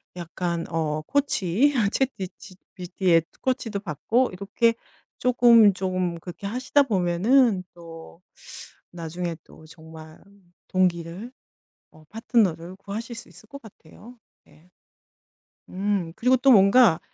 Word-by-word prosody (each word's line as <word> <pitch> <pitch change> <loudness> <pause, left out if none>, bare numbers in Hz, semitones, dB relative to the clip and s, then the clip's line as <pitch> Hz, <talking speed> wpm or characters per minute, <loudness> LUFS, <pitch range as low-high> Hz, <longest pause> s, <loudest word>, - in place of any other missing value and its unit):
약간 170 0 -4
어 155 -2 -2
코치 285 -9 0
이런 245 0 +2
챗 265 +4 0
비치 190 -1 -9 0.2
GPT의 180 -2 +1 0.2
코치도 230 -5 -2
받고 215 - -1
이렇게 205 +5 0 0.4
쪼금, 235 -4 +5
쪼금 185 -2 -3
그렇게 175 +3 -10
하시다 260 +5 +1
보면은 200 +1 +2
또 165 0 -13 0.7
나중에 170 0 -5
또 155 - -18
정말 160 -1 -14 0.5
동기를 180 +4 -1 0.6
어 155 0 -19
파트너를 190 -6 -1
구하실 220 +4 -7
수 - - -11
있을 215 - -18
것 280 +1 -11
같아요. 220 +4 -16 0.3
예. 165 +4 -23 1.0
음 190 -3 -2
그리고 255 +2 +2
또 270 +2 +4
뭔가 200 -3 +5
190 Hz, 240 characters per minute, -24 LUFS, 170-230 Hz, 1.0 s, 쪼금